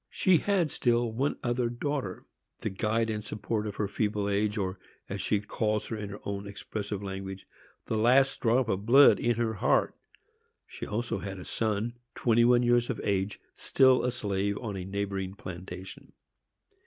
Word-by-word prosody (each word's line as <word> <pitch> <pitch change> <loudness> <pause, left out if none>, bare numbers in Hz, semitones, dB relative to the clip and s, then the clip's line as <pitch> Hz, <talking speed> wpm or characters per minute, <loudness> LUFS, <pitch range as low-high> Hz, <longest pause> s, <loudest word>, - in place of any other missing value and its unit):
She 185 -3 +3
had 180 -3 +1
still 120 -1 +1
one 130 +6 -1
other 120 -1 0
daughter, 120 -5 -3 0.4
the - - -2
guide 110 +3 0
and 105 -1 -3
support 105 +1 -3
of 105 - -5
her 105 - -1
feeble 105 0 -1
age, 105 +1 0
or, 95 -2 -2 0.3
as - - -4
she 105 - +1
calls 105 0 -1
her 115 - -4
in 105 -2 -5
her 100 - -8
own 100 0 -4
expressive 100 0 -5
language, 95 0 -6 0.4
"the 110 - -1
last 130 +4 +4
drop 120 +1 +3
of 100 0 -2
blood 135 +4 +7
in 120 0 +1
her 115 -1 0
heart." 100 - +2 0.7
She - - -8
had - - -10
also 115 -1 -1
a 95 -2 -6
son, 110 +2 -2 0.2
twenty 120 -1 +3
one 120 0 +5
years 120 0 +3
of 120 - -2
age, 100 0 -1
still 130 -1 +4
a 125 - +2
slave 100 -3 -1
on 110 -5 -5
a 90 -1 -5
neighboring 95 -1 -3
plantation. 95 0 -9
105 Hz, 175 wpm, -29 LUFS, 100-120 Hz, 0.7 s, blood